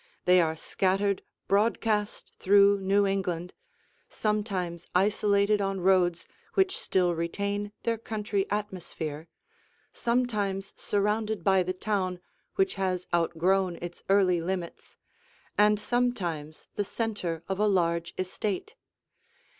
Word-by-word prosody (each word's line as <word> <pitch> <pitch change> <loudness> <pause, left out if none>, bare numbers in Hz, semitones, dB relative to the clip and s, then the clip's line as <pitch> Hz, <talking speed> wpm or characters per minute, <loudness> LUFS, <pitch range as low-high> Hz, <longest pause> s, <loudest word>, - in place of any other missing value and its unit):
They 180 0 +6
are 160 -1 0
scattered 195 +4 0 0.3
broadcast 210 0 +1
through 200 +1 +5
New 200 +1 +2
England, 180 -3 -2 0.6
sometimes 195 -6 -2
isolated 200 +1 +3
on 195 -1 -1
roads 180 -2 +3 0.3
which 385 -1 +3
still 180 -2 +1
retain 200 +5 -2
their 230 -1 0
country 210 -3 -2
atmosphere, 175 -6 -4 0.7
sometimes 210 -5 -1
surrounded 210 -1 -1
by 190 0 +4
the 185 +1 -1
town 185 -2 -1 0.4
which 190 0 +2
has 185 -1 0
outgrown 175 +2 +2
its 175 0 -7
early 185 -3 +4
limits, 175 0 -5 0.6
and 210 0 +4
sometimes 185 -11 -2
the 205 - -1
center 195 -7 -3
of 190 0 -2
a 210 - +3
large 170 -4 +1
estate. 185 +1 -3
195 Hz, 110 wpm, -28 LUFS, 180-210 Hz, 0.7 s, They